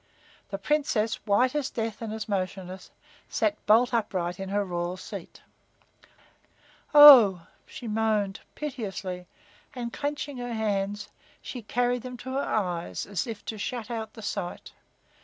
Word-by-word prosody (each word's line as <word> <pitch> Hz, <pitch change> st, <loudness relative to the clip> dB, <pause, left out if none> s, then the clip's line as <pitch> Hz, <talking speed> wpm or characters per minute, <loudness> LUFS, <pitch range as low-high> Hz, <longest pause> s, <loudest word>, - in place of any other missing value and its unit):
The -, -, -3 dB
Princess, 260 Hz, -8 st, 0 dB
white 245 Hz, +5 st, +3 dB
as 295 Hz, -3 st, -1 dB
death 225 Hz, -1 st, -4 dB
and 225 Hz, -2 st, -4 dB
as 220 Hz, -1 st, -5 dB
motionless, 185 Hz, -2 st, -4 dB, 0.4 s
sat 210 Hz, -2 st, 0 dB
bolt 235 Hz, +4 st, +5 dB
upright 180 Hz, -6 st, -1 dB
in 195 Hz, 0 st, -5 dB
her 205 Hz, +1 st, 0 dB
royal 175 Hz, 0 st, -3 dB
seat. -, -, -9 dB, 1.5 s
"Oh!" 245 Hz, -, +10 dB, 0.2 s
she 240 Hz, -, -8 dB
moaned, 215 Hz, -2 st, 0 dB, 0.2 s
piteously, 195 Hz, -10 st, -5 dB, 0.5 s
and, 235 Hz, -2 st, -4 dB
clenching 290 Hz, -1 st, -3 dB
her 245 Hz, -1 st, -4 dB
hands, 205 Hz, -1 st, -1 dB, 0.3 s
she 250 Hz, -, -7 dB
carried 245 Hz, +2 st, 0 dB
them 250 Hz, 0 st, -7 dB
to 260 Hz, +2 st, -7 dB
her 270 Hz, -, 0 dB
eyes 180 Hz, -10 st, -2 dB
as 200 Hz, 0 st, -3 dB
if 220 Hz, -3 st, -7 dB
to 220 Hz, -, -5 dB
shut 240 Hz, +1 st, -4 dB
out 225 Hz, -2 st, -4 dB
the 220 Hz, -, -11 dB
sight. 175 Hz, -3 st, -4 dB
220 Hz, 140 wpm, -27 LUFS, 195-245 Hz, 1.5 s, Oh